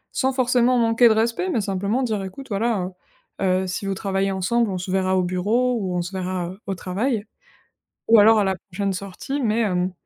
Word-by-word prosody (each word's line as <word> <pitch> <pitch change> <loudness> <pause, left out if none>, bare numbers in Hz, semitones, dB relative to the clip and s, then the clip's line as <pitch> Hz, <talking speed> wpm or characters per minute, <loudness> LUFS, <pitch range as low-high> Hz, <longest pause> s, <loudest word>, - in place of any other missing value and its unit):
Sans 265 0 +1
forcément 250 -1 +2
manquer 230 +1 +4
de - - +5
respect, 230 +11 0
mais 320 - 0
simplement 200 +6 -1
dire: 215 -5 -1
«Écoute, 195 +9 -8
voilà, 205 -3 -1 0.5
heu - - 0 0.2
heu», - - -4
si 185 +2 -4
vous 195 - -1
travaillez 195 0 -1
ensemble: 210 +5 0
«On 190 - -2
se 180 +1 -5
verra 190 0 +1
au 185 - +2
bureau 210 +8 +1
ou 185 -2 -2
on - - 0
se 175 - -7
verra 185 -1 -3
au 195 - -2
travail 205 +5 -2 0.8
ou 225 -1 +7
alors 220 +1 +6
à 205 - +2
la 190 0 0
prochaine 195 +1 -4
sortie», 200 +9 -5
mais, 220 0 +1
hem, 180 -4 0
200 Hz, 210 wpm, -22 LUFS, 185-235 Hz, 0.8 s, ou